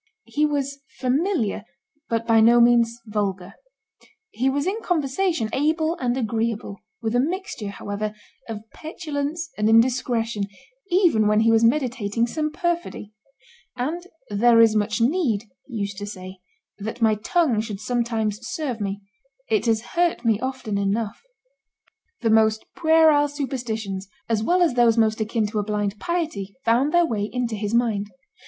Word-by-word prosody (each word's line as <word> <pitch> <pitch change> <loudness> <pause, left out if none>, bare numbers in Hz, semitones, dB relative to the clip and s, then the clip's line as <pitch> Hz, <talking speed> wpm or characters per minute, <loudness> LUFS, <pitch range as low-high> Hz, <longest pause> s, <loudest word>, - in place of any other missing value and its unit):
He 300 +1 +1
was 280 -1 -2 0.2
"familiar," 265 - 0 0.5
but 230 -2 +1
not 230 - -19
by 225 -1 +5
no 235 +2 +6
means 235 -1 +4
"vulgar;" 200 -3 -3 0.8
he 255 +4 0
was 285 +2 -1
in 410 +5 -1
conversation 325 - 0
able 315 +4 +1
and 250 -3 -1
agreeable, 225 -3 -2 0.2
with 220 0 -1
a - - +4
mixture, 335 - -2
however, 205 +1 -4 0.3
of 220 0 -6
petulance 315 0 -4
and 210 +1 +3
indiscretion, 230 -2 +2 0.4
even 345 - +4
when 210 +1 +3
he 225 0 +4
was 225 0 +4
meditating 235 -3 +1
some 305 +5 -2
perfidy; 340 - -3 0.6
and 320 +8 -3 0.2
"there 230 +3 +5
is 225 -1 +6
much 210 +1 0
need," 245 - +1 0.2
he 250 - -9
used 200 -2 -3
to 205 - -5
say, 185 -2 -9 0.4
"that 220 +3 -4
my 220 -1 +5
tongue 235 - +1
should 215 -3 -6
sometimes 225 -2 -1
serve 250 -2 -4
me; 200 0 -3 0.5
it 220 +2 +2
has 220 -1 +2
hurt 340 -7 +1
me 220 -2 +3
often 255 -6 -3
enough." 205 +2 -1 1.0
The 225 - +2
most 220 0 +3
puerile 315 -2 +5
superstitions, 235 -9 -4 0.2
as 225 -2 +1
well 355 +10 +3
as 330 - +2
those 240 -2 +4
most 220 -1 +2
akin 220 0 0
to 210 +1 -2
a - - 0
blind 205 0 -2
piety, 310 - -3
found 245 +6 +3
their 345 0 +4
way 210 -7 -2
into 245 -1 -2
his 210 +1 -2
mind. 215 -4 +1
230 Hz, 155 wpm, -23 LUFS, 215-285 Hz, 1.0 s, no